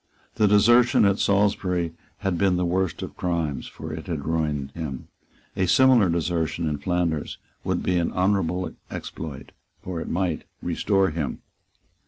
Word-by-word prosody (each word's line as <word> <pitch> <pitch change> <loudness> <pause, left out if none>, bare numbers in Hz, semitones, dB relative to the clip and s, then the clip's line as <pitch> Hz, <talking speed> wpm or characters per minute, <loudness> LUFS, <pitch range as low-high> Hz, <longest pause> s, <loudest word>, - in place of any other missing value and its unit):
The 105 - +4
desertion 120 +3 +5
at 100 0 +3
Salisbury 95 -4 +1 0.3
had 95 -3 0
been 95 +1 +2
the 90 - +1
worst 90 0 -1
of - - -7
crimes; 80 -6 -2
for - - -8
it - - -7
had - - -3
ruined 75 -4 -1
him. 70 -4 -6 0.5
A 95 - +1
similar 125 -2 +5
desertion 85 0 -1
in 75 -2 -2
Flanders 85 -4 -1 0.3
would - - -1
be 90 - +1
an 85 - 0
honourable 95 -1 0 0.2
exploit; 75 -4 -7 0.3
for 90 -3 -4
it - - -5
might 90 -2 -1
restore 95 -3 +1
him. 75 -3 -4
90 Hz, 150 wpm, -25 LUFS, 80-95 Hz, 0.5 s, desertion